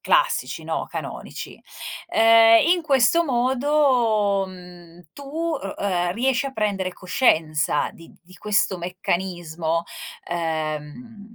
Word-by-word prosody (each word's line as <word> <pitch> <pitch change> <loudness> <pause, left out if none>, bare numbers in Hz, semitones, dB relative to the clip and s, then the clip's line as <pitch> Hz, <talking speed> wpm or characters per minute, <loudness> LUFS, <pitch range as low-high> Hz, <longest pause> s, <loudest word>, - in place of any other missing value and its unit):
classici, - - +1
no, - - -3
canonici. - - -7 0.5
Ehm, 225 +1 +6
in 355 0 +3
questo 285 +3 +3
modo, 245 -6 +2
mhmm, 175 -2 -14
tu 285 - -11
u 330 0 -2 0.2
ehm, 180 -3 0
riesci 260 +4 0
a 270 - -6
prendere 200 -5 -2
coscienza 165 - +1
di 165 - -15
di 185 +1 -18
questo 210 -3 0
meccanismo, 175 -2 -2 0.5
ehm, 165 +7 -5
200 Hz, 105 wpm, -23 LUFS, 175-250 Hz, 0.5 s, Ehm